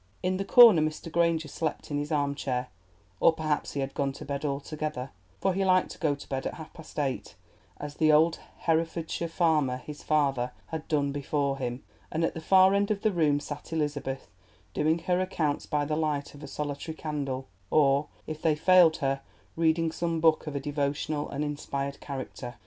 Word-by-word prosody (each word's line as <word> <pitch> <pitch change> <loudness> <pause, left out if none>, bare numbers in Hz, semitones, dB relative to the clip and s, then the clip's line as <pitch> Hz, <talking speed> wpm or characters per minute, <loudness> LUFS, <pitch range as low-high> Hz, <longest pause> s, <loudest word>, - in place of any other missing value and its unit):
In 185 +1 +1
the 195 - -2
corner 230 -9 +8
Mr. 155 +1 -3
Granger 165 -2 +2
slept 155 0 -4
in 145 - 0
his 145 +2 -4
armchair, 140 -4 -1 0.5
or - - +6
perhaps 155 -2 -2
he 140 - -1
had 135 0 -3
gone 140 -1 0
to - - -9
bed 140 0 -4
altogether, 145 -1 -3 0.3
for 190 - +1
he 195 +2 0
liked 185 -1 +3
to - - -10
go 145 -3 +1
to 140 - -12
bed 135 0 -2
at - - -5
half 160 -2 -10
past 160 - -13
eight, 135 -3 -2 0.4
as 145 0 -6
the 155 +1 +3
old 160 +2 +4 0.3
Herefordshire 165 +1 0
farmer, 155 -6 +2
his 145 +3 -9
father, 135 -5 +1 0.2
had 160 -1 -5
done 145 -2 +1
before 140 -1 -1
him; 125 0 -4 0.3
and 160 +1 0
at - - +1
the 160 - -6
far 190 +3 +6
end 200 0 +2
of 210 -1 -1
the 215 - +3
room 155 -5 +2
sat 145 +1 -8
Elizabeth, 145 -4 -2 0.5
doing 155 +2 +2
her 180 +2 0
accounts 160 -6 -1
by 150 -1 0
the 150 +1 -1
light 150 -2 -1
of 145 - -13
a - - -7
solitary 150 +2 -4
candle, 140 -4 -3 0.2
or, 140 -1 +3 0.2
if 155 0 -6
they 160 -2 +3
failed 170 0 +6
her, 135 0 0 0.3
reading 165 0 +2
some 165 0 -1
book 160 -1 +3
of 150 - -4
a - - 0
devotional 145 +1 -2
and 145 +2 -2
inspired 140 -1 -4
character. 130 -3 -6
150 Hz, 195 wpm, -28 LUFS, 140-165 Hz, 0.5 s, corner